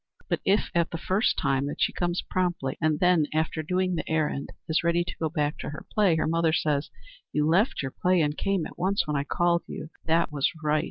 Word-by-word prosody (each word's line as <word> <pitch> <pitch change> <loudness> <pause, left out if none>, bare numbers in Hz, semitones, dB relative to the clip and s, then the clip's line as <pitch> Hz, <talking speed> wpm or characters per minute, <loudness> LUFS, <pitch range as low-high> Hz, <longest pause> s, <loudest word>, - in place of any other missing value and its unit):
But - - 0
if, 200 +2 +2
at 170 -1 +2
the 165 - -4
first 190 +6 +1
time 135 +1 +1
that 145 - -5
she - - +2
comes 175 0 -1
promptly, 175 -7 -1
and 155 -1 +2
then, 180 -4 +4
after 160 0 0
doing 185 +3 0
the 170 - -3
errand, 155 -3 0 0.2
is 160 - +2
ready 170 0 +2
to 175 - -7
go 160 - 0
back 150 -2 -1
to - - -4
her 150 - -8
play, 200 -6 +4
her 160 - +1
mother 165 0 +2
says, 150 -2 0 0.4
"You 150 0 +1
left 185 - +2
your 135 - -3
play 180 +4 +2
and 150 -1 0
came 195 -2 0
at - - -10
once 195 +2 +1
when 150 -2 -2
I 140 - +1
called 170 +3 +1
you. 155 - -7 0.2
That 165 0 +2
was 140 -2 +1
right. 155 0 +2
160 Hz, 230 wpm, -27 LUFS, 150-180 Hz, 0.4 s, then